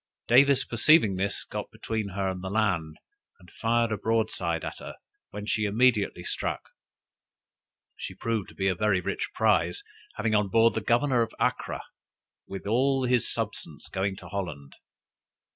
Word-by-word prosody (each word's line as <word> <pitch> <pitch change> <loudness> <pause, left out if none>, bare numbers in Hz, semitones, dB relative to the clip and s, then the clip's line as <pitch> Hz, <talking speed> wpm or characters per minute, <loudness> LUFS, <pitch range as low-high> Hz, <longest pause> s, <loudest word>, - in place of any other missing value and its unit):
Davis 140 +2 +6
perceiving 115 - +4
this, 100 +2 -1
got - - -6
between 110 -3 -4
her 95 0 -2
and 95 -1 -4
the 95 - -3
land, 95 -7 0 0.4
and 90 -2 -18
fired 115 0 +1
a 110 - 0
broadside 110 -1 0
at - - -6
her, - - -8 0.3
when 105 - -7
she 105 0 0
immediately 110 0 +2
struck. - - -3 1.3
She - - -6
proved 115 -4 -2
to - - -15
be 95 - 0
a 95 - +3
very 100 +1 +2
rich 90 - -3
prize, 95 -6 +2 0.3
having 110 0 0
on 105 -1 +3
board 115 +4 +4
the 110 - -2
Governor 120 +3 +2
of 115 -1 -2
Acra, - - -1 0.6
with 95 0 -7
all 130 +5 +2
his 125 -2 +2
substance, - - -5
going 95 +1 -1
to - - -11
Holland. 80 -8 -5
105 Hz, 160 wpm, -27 LUFS, 95-115 Hz, 1.3 s, Davis